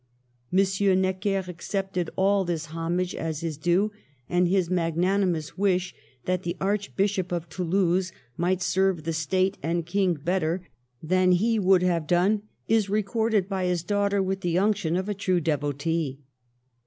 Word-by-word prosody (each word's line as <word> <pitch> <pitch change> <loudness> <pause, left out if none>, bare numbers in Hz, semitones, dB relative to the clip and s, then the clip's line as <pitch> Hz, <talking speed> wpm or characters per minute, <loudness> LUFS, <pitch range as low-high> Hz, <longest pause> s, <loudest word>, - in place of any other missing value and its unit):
M. 190 0 +3
Necker 190 +1 0
accepted 180 0 -3
all 195 +1 +3
this 170 -3 -2
homage 175 +2 -1
as 160 -1 -4
his 165 -2 -3
due, 175 +7 +1 0.4
and 175 0 +2
his 185 -1 +2
magnanimous 175 0 0
wish, 185 -2 +1 0.3
that 180 0 0
the 175 0 -4
Archbishop 200 -1 -1
of 170 -1 -2
Toulouse 180 +1 0 0.2
might 180 +3 0
serve 190 -4 +1
the 165 +1 -2
State 185 +4 0
and 165 +2 -1
King 185 0 +1
better 175 +2 -1 0.4
than 185 +2 +3
he 220 +5 +2
would 190 -2 +4
have 170 -4 +1
done, 190 +5 +3 0.3
is 220 -3 +2
recorded 215 0 +1
by 190 -2 -2
his 180 -2 0
daughter 200 0 +1
with 190 0 -2
the 175 -1 0
unction 195 -4 +1
of 185 +2 -1
a 210 - -1
true 185 -2 0
devotee. 145 -1 -1
185 Hz, 150 wpm, -26 LUFS, 170-195 Hz, 0.4 s, would